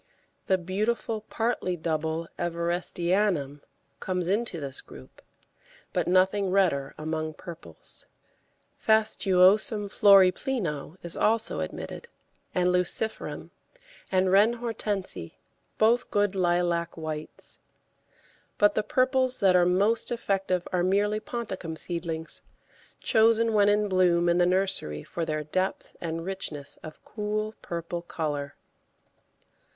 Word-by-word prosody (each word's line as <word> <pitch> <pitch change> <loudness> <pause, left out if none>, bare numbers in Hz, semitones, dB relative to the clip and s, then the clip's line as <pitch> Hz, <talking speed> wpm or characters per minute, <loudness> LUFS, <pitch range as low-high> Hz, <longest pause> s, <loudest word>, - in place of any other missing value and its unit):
The 190 - +3
beautiful 215 +5 -2
partly 225 -6 -1
double 160 0 -2
Everestianum 170 -2 0 0.4
comes 180 -2 -2
into 200 -2 -1
this 140 -3 -3
group, 65 - -14 0.7
but - - 0
nothing 190 +2 +3
redder 175 -8 +1
among 155 0 -3
purples. 115 - -9 0.8
Fastuosum 210 0 +4
florepleno 190 - +3
is 170 - -3
also 225 +1 +1
admitted, 475 - -6 0.5
and 180 0 +3
Luciferum 180 +5 -2 0.6
and 185 0 +2
Reine 205 +4 +5
Hortense, 220 -5 -3 0.6
both 230 +3 +3
good 205 -1 +1
lilac 175 -2 0
whites. 155 -1 -7 1.0
But 205 0 +4
the - - +1
purples 255 +2 +1
that 190 -2 +4
are 175 -1 +5
most 205 +7 +2
effective 195 -6 -1
are 180 - +2
merely 205 +3 +2
ponticum 195 -8 -5
seedlings, 165 -2 -4 0.6
chosen 225 0 +3
when 205 -1 +5
in 210 0 +2
bloom 175 -2 +3
in 170 +1 +3
the 175 - +4
nursery 180 - 0
for 170 - -4
their 155 -1 -2
depth 185 +5 -2
and 165 0 -4
richness 160 -7 -5
of 155 -1 -11
cool 215 0 -3
purple 170 0 -4
colour. 145 -4 -4
185 Hz, 110 wpm, -27 LUFS, 170-210 Hz, 1.0 s, Reine